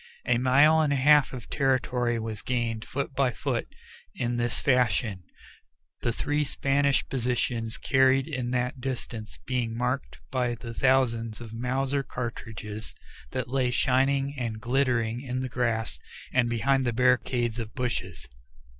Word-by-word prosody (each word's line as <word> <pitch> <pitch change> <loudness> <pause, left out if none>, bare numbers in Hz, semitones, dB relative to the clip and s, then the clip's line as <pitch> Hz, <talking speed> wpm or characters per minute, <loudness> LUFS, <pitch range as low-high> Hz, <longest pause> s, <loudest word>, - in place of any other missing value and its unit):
A 125 -1 +2
mile 145 +5 +5
and 150 -2 +2
a - - +3
half 145 +1 +5
of 125 -3 -8
territory 125 -3 +1
was 110 -2 -4
gained 120 -2 -2
foot 140 +1 -3
by 135 -1 +2
foot 120 - -2 0.5
in 120 0 -1
this 120 0 -1
fashion, 120 -6 +2 0.8
the 120 - +1
three 145 +5 0
Spanish 140 0 +1
positions 120 -3 -1
carried 130 0 +3
in 130 -6 -3
that 125 +1 -1
distance 120 -4 -5
being 120 -3 -1
marked 125 +3 -2
by 125 -2 0
the 115 0 -8
thousands 115 -4 +2
of 115 -2 -9
Mauser 130 +4 0
cartridges 110 -4 -6 0.3
that 130 - -3
lay 130 0 +1
shining 135 +2 +2
and 115 -3 -3
glittering 120 -2 +1
in 130 -1 -3
the 130 - -3
grass 115 - -1 0.3
and 120 -2 +3
behind 135 +3 +2
the 120 -2 0
barricades 120 -1 +2
of 110 -1 -6
bushes. 105 - -3
125 Hz, 145 wpm, -27 LUFS, 115-135 Hz, 0.8 s, mile